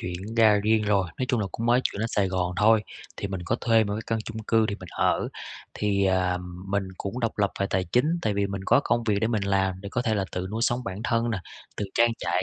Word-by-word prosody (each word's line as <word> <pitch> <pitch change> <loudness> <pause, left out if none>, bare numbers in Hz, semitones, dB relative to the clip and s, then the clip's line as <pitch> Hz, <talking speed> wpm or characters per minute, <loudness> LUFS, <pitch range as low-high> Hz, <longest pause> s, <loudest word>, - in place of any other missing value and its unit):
chuyển 90 +5 -5
ra 110 -2 +6
riêng 110 +1 +3
rồi. 100 -3 +2
Nói 130 - 0
chung 120 - +1
là 100 - -1
cũng 115 - -3
mới 120 +1 +4
chuyển 100 - -1
lên 110 - 0
Sài 100 -3 +1
Gòn 90 -1 -1
thôi, 110 +1 +5 0.3
thì - - -3
mình 95 -2 -4
có 115 - 0
thuê 115 -2 +3
một 100 - -3
cái 110 - -4
căn 115 - 0
chung 110 0 -6
cư 110 0 +2
để 100 - -2
mình 90 - -9
ở. - - +1 0.5
Thì, 100 -1 +1
ờm, 90 -1 -1
mình 100 -1 0
cũng 115 +6 -4
độc 115 -2 -2
lập 100 -2 +2
về 100 - +2
tài 95 0 +1
chính, 120 - +2 0.2
tại 105 -2 0
vì 100 0 +1
mình 100 -1 -5
có 135 - +5
công 120 - +1
việc 105 -3 +2
để 110 - +2
mình 110 -3 0
làm 95 -1 0
để 100 - -7
có 120 +4 -1
thể 115 -3 +1
là 100 -2 0
tự 90 0 -3
nuôi 110 +2 -2
sống 120 +1 +1
bản 95 0 -5
thân 115 0 +1
nè, 110 - -1 0.4
tự 105 - -2
trang 120 0 +4
trải 85 +2 0
105 Hz, 275 wpm, -26 LUFS, 95-115 Hz, 0.5 s, ra